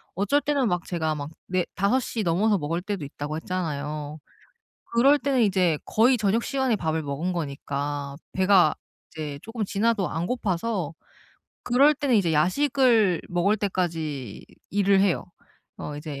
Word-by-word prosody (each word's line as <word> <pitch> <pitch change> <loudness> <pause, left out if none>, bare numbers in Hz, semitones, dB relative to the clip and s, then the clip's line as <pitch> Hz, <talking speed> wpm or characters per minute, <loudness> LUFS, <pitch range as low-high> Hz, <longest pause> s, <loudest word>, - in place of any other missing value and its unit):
어쩔 205 +10 +2
때는 285 -3 +1
막 175 -3 -1
제가 160 -3 -1
막 145 -1 -5 0.2
"4 185 -1 0
5 200 +7 +2
시 230 -3 -3
넘어서 200 +5 +2
먹을 165 +1 -2
때도 195 -5 -4
있다."고 145 +2 -5
했잖아요. 150 -3 -4 0.7
그럴 270 +5 +5
때는 275 -3 +1
이제 185 -6 +2
거의 245 +4 +4
저녁 215 +2 +1
시간에 265 -5 0
밥을 160 -3 -1
먹은 150 +5 -3
거니까 145 -2 -4 0.2
배가 185 -4 +4 0.4
이제 150 -3 -5
조금 225 -1 -4
지나도 205 -1 0
안 165 +2 -3
고파서 195 - -2 0.7
그럴 275 +5 +4
때는 280 -3 0
이제 185 -7 +3
야식을 220 - +3
먹을 180 +4 +2
때까지 160 - -3 0.3
일을 200 -1 +4
해요. 190 -2 +1 0.5
어 145 - -6
이제 145 -2 -7
185 Hz, 285 characters per minute, -25 LUFS, 155-225 Hz, 0.7 s, 그럴